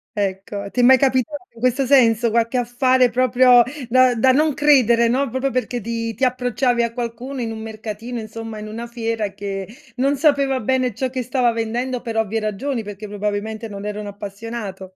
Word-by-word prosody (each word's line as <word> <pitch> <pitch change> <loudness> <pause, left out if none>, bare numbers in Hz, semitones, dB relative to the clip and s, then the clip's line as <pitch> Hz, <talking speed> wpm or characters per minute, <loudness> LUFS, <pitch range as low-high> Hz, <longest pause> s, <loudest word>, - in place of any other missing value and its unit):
Ecco, 200 0 -3
ti - - -3
è - - +4
mai 260 +2 +7
capitato 260 +2 +1 0.2
in 230 - -15
questo 255 +2 +1
senso? 235 -4 +4
Qualche 230 +2 +1
affare 250 +1 +2
proprio, 250 0 +5 0.3
da 255 +1 +4
da 260 +3 +4
non 300 +1 +2
credere, 245 -6 +4
no, 260 +3 +1
proprio 260 +3 -1
perché 250 -1 -2
ti 230 0 -4
ti 265 - -4
approcciavi 245 -1 +1
a 235 - 0
qualcuno 245 +2 -5
in 230 -1 -3
un 220 - -6
mercatino, 220 +2 -6
insomma, 225 0 -7
in 210 0 -7
una 230 +2 -6
fiera, 225 -3 -3
che 195 -1 -5 0.3
non 275 +3 +2
sapeva 280 -3 +2
bene 255 +1 0
ciò 260 +1 -2
che 260 0 -2
stava 245 0 +1
vendendo, 235 +3 -2
per 230 -2 -5
ovvie 225 0 0
ragioni, 220 +4 -3
perché, 205 0 -8
probabilmente, 210 +2 -3
non 200 -1 -8
era 210 0 -4
un 210 - -6
appassionato. 200 -2 -7
235 Hz, 190 wpm, -20 LUFS, 215-255 Hz, 0.3 s, mai